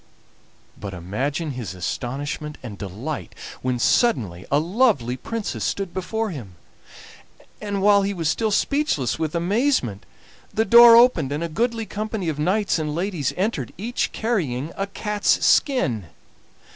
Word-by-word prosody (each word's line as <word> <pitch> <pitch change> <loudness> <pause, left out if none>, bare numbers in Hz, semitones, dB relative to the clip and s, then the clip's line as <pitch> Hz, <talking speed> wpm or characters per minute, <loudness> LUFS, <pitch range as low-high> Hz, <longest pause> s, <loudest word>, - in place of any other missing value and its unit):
But 100 -2 -6
imagine 135 - -3
his 115 -9 -6
astonishment 140 - -4
and 110 -5 -7
delight 105 - -6 0.3
when 130 -1 -1
suddenly 115 - +1
a 140 - +4
lovely 165 - +2
princess 225 - -4
stood 195 -3 -2
before 220 +3 -2
him, 110 - -8 1.1
and, 200 -2 -2
while 205 0 +6
he 200 +1 -1
was 170 -5 -2
still 220 +7 +1
speechless 210 - 0
with 160 0 -2
amazement, 175 - 0 0.4
the 220 - +1
door 235 0 +9
opened 230 - +5
and 150 +3 -2
a - - -1
goodly 230 +5 -1
company 215 -4 -3
of 150 -2 -4
knights 190 +3 +1
and 150 -1 -3
ladies 175 -5 -1
entered, 185 - -2
each 230 +6 -2
carrying 165 - -2
a 195 - -2
cat's 210 +1 0
skin! 125 - +2
170 Hz, 140 wpm, -23 LUFS, 130-215 Hz, 1.1 s, door